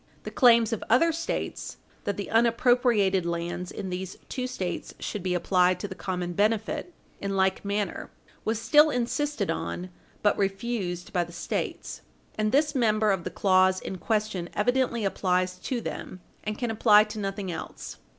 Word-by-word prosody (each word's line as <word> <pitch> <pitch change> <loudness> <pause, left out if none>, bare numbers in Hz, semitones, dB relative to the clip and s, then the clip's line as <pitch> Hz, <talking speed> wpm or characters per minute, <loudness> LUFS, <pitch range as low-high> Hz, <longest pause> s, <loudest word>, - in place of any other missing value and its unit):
The - - -6
claims 235 -3 +5
of 225 - -3
other 330 +9 +5
States 330 +1 -4 0.3
that 200 - -1
the 200 - -5
unappropriated 230 -4 +3
lands 170 +1 -3
in 190 -3 -5
these 185 +1 -5
two 255 -1 -3
States 185 -8 -4
should 210 - -4
be 180 0 -1
applied 180 0 +3
to 205 - -4
the 190 - -6
common 180 -2 -3
benefit 215 - 0 0.3
in 195 0 -2
like 190 0 +2
manner 205 0 -2 0.3
was 220 0 -1
still 300 +6 +6
insisted 250 -2 -1
on, 180 +1 -4 0.3
but 205 - +4
refused 195 -3 -2
by 175 - +2
the 170 - -10
States. 170 - -4 0.3
And 215 0 0
this 295 +2 +3
member 215 -5 +2
of 190 -3 -1
the - - -1
clause 185 -1 +3
in 190 - -6
question 210 -3 -1
evidently 240 0 +1
applies 185 -1 0
to 245 +6 -2
them, 185 -4 -6 0.2
and 215 0 -3
can 240 -2 -2
apply 210 -1 +6
to 215 0 -7
nothing 195 -2 -3
else. - - -7
205 Hz, 165 wpm, -27 LUFS, 185-230 Hz, 0.3 s, still